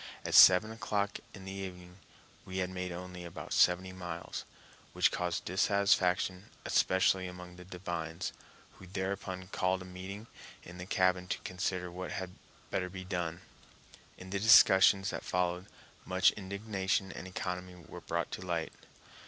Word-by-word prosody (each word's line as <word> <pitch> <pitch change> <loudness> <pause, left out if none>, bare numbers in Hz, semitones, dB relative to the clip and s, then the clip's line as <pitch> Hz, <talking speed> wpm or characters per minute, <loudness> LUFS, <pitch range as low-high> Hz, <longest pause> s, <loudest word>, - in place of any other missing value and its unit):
At - - -3
seven 95 +4 +8
o'clock 105 -2 -2 0.2
in 95 -1 -11
the 95 - -6
evening 90 -2 -8 0.5
we 95 0 -6
had 95 0 -1
made 90 -1 -4
only 90 0 -7
about 85 -1 -7
seventy 90 +1 +3
miles, 85 -2 -6 0.5
which - - +3
caused 90 -1 -2
dissatisfaction, 95 -1 +2 0.2
especially 95 0 +2
among 90 0 -9
the 90 - -11
divines, 85 -3 -5 0.4
who 95 - -13
thereupon 95 0 -4
called 95 -1 0
a - - -11
meeting 95 +3 -8 0.4
in 90 +1 -11
the 90 - -7
cabin 90 -1 +2
to - - -1
consider 90 -1 -3
what 90 +1 -6
had 95 -1 -4 0.4
better 90 -1 -1
be 95 0 -7
done. 85 -3 -3 0.8
In 95 0 -10
the 100 - -1
discussions 95 -2 +7
that - - -5
followed 90 0 -1 0.4
much 95 0 +4
indignation 100 -1 -2
and 95 - -8
economy 90 0 -5
were - - -9
brought - - -2
to - - -5
light. 85 -3 -2
90 Hz, 150 wpm, -32 LUFS, 90-95 Hz, 0.8 s, seven